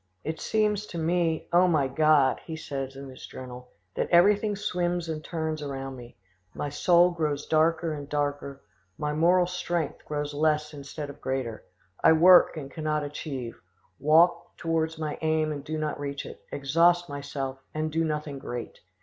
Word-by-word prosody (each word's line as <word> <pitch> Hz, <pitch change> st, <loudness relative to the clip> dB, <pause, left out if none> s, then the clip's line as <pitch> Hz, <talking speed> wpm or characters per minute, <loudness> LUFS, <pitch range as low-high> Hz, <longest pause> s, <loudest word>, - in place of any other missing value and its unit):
"It 160 Hz, +1 st, -4 dB
seems 210 Hz, -1 st, 0 dB
to 170 Hz, -, -7 dB
me, 165 Hz, 0 st, 0 dB
O 180 Hz, +1 st, +6 dB
my 155 Hz, -6 st, +2 dB
God!" 150 Hz, 0 st, +3 dB
he 160 Hz, -, -6 dB
says 135 Hz, -4 st, -5 dB
in 135 Hz, 0 st, -8 dB
his 130 Hz, -1 st, -10 dB
journal, 125 Hz, -1 st, -9 dB, 0.2 s
"that -, -, -2 dB
everything 205 Hz, +4 st, +4 dB
swims 175 Hz, -4 st, -1 dB
and 155 Hz, -1 st, -4 dB
turns 160 Hz, -2 st, -3 dB
around 135 Hz, -2 st, -5 dB
me. 120 Hz, -1 st, -12 dB, 0.4 s
My 145 Hz, -, -3 dB
soul 175 Hz, +4 st, +4 dB
grows 150 Hz, -4 st, -2 dB
darker 160 Hz, +1 st, +2 dB
and 145 Hz, -1 st, -7 dB
darker; 145 Hz, -1 st, -2 dB, 0.3 s
my 150 Hz, 0 st, -2 dB
moral 175 Hz, +4 st, +4 dB
strength 175 Hz, -3 st, -3 dB
grows 145 Hz, -1 st, -3 dB
less 150 Hz, 0 st, +1 dB
instead 145 Hz, +1 st, -7 dB
of -, -, -17 dB
greater; 130 Hz, -4 st, -3 dB, 0.4 s
I -, -, +7 dB
work 175 Hz, +1 st, +7 dB
and 140 Hz, -3 st, -7 dB
cannot 155 Hz, -1 st, -1 dB
achieve; 135 Hz, -, -6 dB, 0.4 s
walk 170 Hz, +4 st, +3 dB
towards 160 Hz, -1 st, -1 dB
my 155 Hz, -2 st, -4 dB
aim 155 Hz, -1 st, +1 dB
and 145 Hz, -2 st, -5 dB
do 155 Hz, +2 st, -4 dB
not 155 Hz, -2 st, -3 dB
reach 140 Hz, 0 st, -4 dB
it; -, -, -10 dB
exhaust 170 Hz, +5 st, +3 dB
myself, 140 Hz, -2 st, -5 dB
and 155 Hz, 0 st, -2 dB
do 165 Hz, +1 st, +1 dB
nothing 150 Hz, -3 st, -3 dB
great. 120 Hz, -2 st, -6 dB
155 Hz, 165 wpm, -27 LUFS, 140-170 Hz, 0.4 s, I